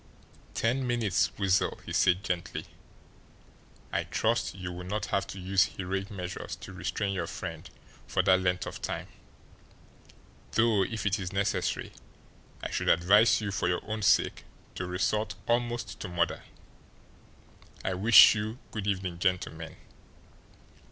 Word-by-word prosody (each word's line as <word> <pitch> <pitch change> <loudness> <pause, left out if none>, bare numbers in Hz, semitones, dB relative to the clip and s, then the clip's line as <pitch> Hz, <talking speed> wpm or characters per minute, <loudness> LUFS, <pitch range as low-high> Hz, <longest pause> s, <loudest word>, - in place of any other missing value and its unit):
"Ten 125 +3 0
minutes, 115 -6 +1
Weasel," 95 -2 +1
he - - -6
said 90 +1 +3
gently. 90 -2 -3 1.3
"I - - 0
trust - - 0
you 90 -2 -5
will 90 0 -7
not 100 +2 -3
have 100 - +1
to 100 - -7
use 95 +1 +3
heroic 95 +1 -3
measures 90 -4 -5
to 95 - -10
restrain 100 +2 -2
your 85 -3 -2
friend 85 0 -6 0.4
for 95 - +1
that 95 0 +4
length 90 0 0
of - - -7
time, - - -4 1.4
though 110 -3 +3
if 110 +1 -4
it 100 +1 +1
is 90 -1 -4
necessary 100 0 -1 0.7
I - - -3
should - - 0
advise 105 +6 +5
you 105 -2 -2
for 90 - -1
your 90 0 -1
own 110 0 -3
sake 95 - +3 0.3
to 90 - -4
resort 95 +4 -1
almost 120 -3 -1
to - - -5
murder. 85 -1 -1 1.4
I 95 - 0
wish 100 +3 +8
you 110 +2 -3
good 105 -2 -4
evening, 95 -3 -2
gentlemen." 90 -3 -2
95 Hz, 140 wpm, -29 LUFS, 90-105 Hz, 1.4 s, wish